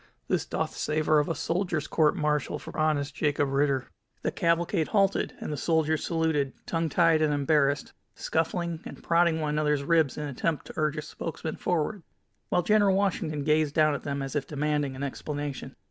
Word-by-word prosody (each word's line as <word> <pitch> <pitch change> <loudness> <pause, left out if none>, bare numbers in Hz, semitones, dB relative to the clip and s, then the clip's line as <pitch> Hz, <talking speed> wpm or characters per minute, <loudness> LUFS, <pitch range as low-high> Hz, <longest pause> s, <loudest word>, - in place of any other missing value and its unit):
This - - 0
doth - - -2
savor 155 0 +2
of 150 - 0
a 165 - -1
soldier's 165 0 -1
court 155 0 +2
martial 150 -4 0
for - - -10
honest 150 -2 0
Jacob 145 -1 0
Ritter." 135 -1 +1 0.4
The - - 0
cavalcade 170 -1 +1
halted, 195 -2 +1
and - - -4
the - - -4
soldiers 160 0 +1
saluted, 160 -5 0
tongue 165 -1 -1
tied 165 -1 +4
and 155 -1 +3
embarrassed, 145 0 +1 0.2
scuffling, 170 0 -1
and - - -10
prodding 170 -1 +3
one 150 -1 -1
another's 150 -1 +1
ribs 160 -2 +2
in 150 - -3
an 145 - -3
attempt 150 +3 -2
to - - -9
urge 155 -1 0
a 155 - -3
spokesman 160 0 -5
forward, 175 +4 -1 0.5
while 180 - +2
General 205 -1 +4
Washington 170 -7 0
gazed 150 -1 +2
down 155 -1 +4
at 140 - -3
them 140 -1 -3
as 135 +1 -5
if 145 -2 -1
demanding 150 -2 -1
an 135 - -5
explanation. 140 -1 -5
155 Hz, 185 wpm, -28 LUFS, 145-165 Hz, 0.5 s, tied